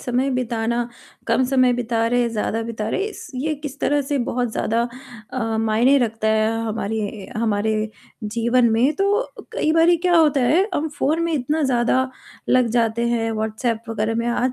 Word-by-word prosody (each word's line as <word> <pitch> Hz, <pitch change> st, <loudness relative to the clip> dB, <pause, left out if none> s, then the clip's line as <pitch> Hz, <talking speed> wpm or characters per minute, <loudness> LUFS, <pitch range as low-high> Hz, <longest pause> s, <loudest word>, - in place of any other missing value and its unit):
समय 250 Hz, +2 st, 0 dB
बिताना, 235 Hz, -1 st, -1 dB, 0.4 s
कम 260 Hz, -, +2 dB
समय 255 Hz, -1 st, +3 dB
बिता 235 Hz, -2 st, 0 dB
रहे 245 Hz, +1 st, +2 dB
हैं, 240 Hz, -, +1 dB
ज़्यादा 225 Hz, 0 st, -2 dB
बिता 225 Hz, -2 st, -4 dB
रहे, 390 Hz, -, -1 dB
इस 430 Hz, -, -7 dB
ये 300 Hz, +5 st, -1 dB
किस 285 Hz, -2 st, -6 dB
तरह 290 Hz, 0 st, +2 dB
से 280 Hz, +1 st, -1 dB
बहुत 245 Hz, -1 st, -1 dB
ज़्यादा 230 Hz, +2 st, 0 dB, 0.5 s
अ, 225 Hz, -3 st, -1 dB
मायने 225 Hz, +5 st, +3 dB
रखता 225 Hz, -3 st, -1 dB
है 220 Hz, 0 st, +2 dB
हमारे 215 Hz, -1 st, -3 dB
हमारे 220 Hz, -1 st, 0 dB, 0.5 s
जीवन 235 Hz, +3 st, +2 dB
में, 245 Hz, +7 st, +3 dB
तो 410 Hz, +5 st, +1 dB, 0.2 s
कई 310 Hz, -, +1 dB
बारी 330 Hz, +2 st, +5 dB
क्या 350 Hz, +1 st, +2 dB
होता 305 Hz, -4 st, +4 dB
है, 330 Hz, -, +3 dB
हम 315 Hz, +2 st, 0 dB
फ़ोन 315 Hz, +4 st, +1 dB
में 335 Hz, 0 st, 0 dB
इतना 300 Hz, +2 st, 0 dB
ज़्यादा 260 Hz, 0 st, +2 dB, 0.4 s
लग 255 Hz, -2 st, +4 dB
जाते 230 Hz, 0 st, +1 dB
हैं, 230 Hz, -1 st, 0 dB
व्हाट्सएप 220 Hz, +1 st, -2 dB
वगैरह 225 Hz, 0 st, -1 dB
में 230 Hz, +1 st, -1 dB
आज 245 Hz, +2 st, 0 dB
240 Hz, 180 wpm, -21 LUFS, 225-275 Hz, 0.5 s, बारी